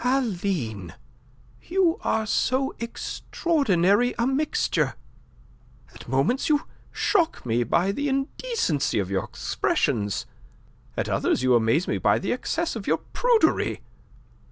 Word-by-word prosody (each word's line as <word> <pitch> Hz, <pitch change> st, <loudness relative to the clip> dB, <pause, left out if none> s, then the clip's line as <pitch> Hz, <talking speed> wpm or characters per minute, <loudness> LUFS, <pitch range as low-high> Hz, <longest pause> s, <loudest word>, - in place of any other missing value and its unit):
"Aline, 180 Hz, -, -1 dB, 0.7 s
you 365 Hz, +1 st, +1 dB
are 220 Hz, 0 st, +1 dB
so 260 Hz, +5 st, +1 dB
extraordinary 235 Hz, -, +1 dB
a 235 Hz, -, +1 dB
mixture. 300 Hz, -, 0 dB, 1.0 s
At -, -, -13 dB
moments 140 Hz, -, +1 dB
you 295 Hz, -1 st, +3 dB, 0.3 s
shock 345 Hz, -, +1 dB
me 120 Hz, 0 st, +1 dB
by 175 Hz, -, +1 dB
the 285 Hz, +7 st, -2 dB
indecency 270 Hz, -, -1 dB
of 100 Hz, -2 st, -1 dB
your 95 Hz, -, 0 dB
expressions; 105 Hz, -3 st, -1 dB, 0.7 s
at -, -, -1 dB
others -, -, +1 dB
you 130 Hz, -1 st, +4 dB
amaze 120 Hz, +9 st, +3 dB
me -, -, -1 dB
by -, -, +3 dB
the 190 Hz, -, -2 dB
excess 325 Hz, +6 st, -2 dB
of 215 Hz, -3 st, -6 dB
your -, -, +3 dB, 0.2 s
prudery. 465 Hz, -10 st, +2 dB
230 Hz, 120 wpm, -25 LUFS, -, 1.0 s, you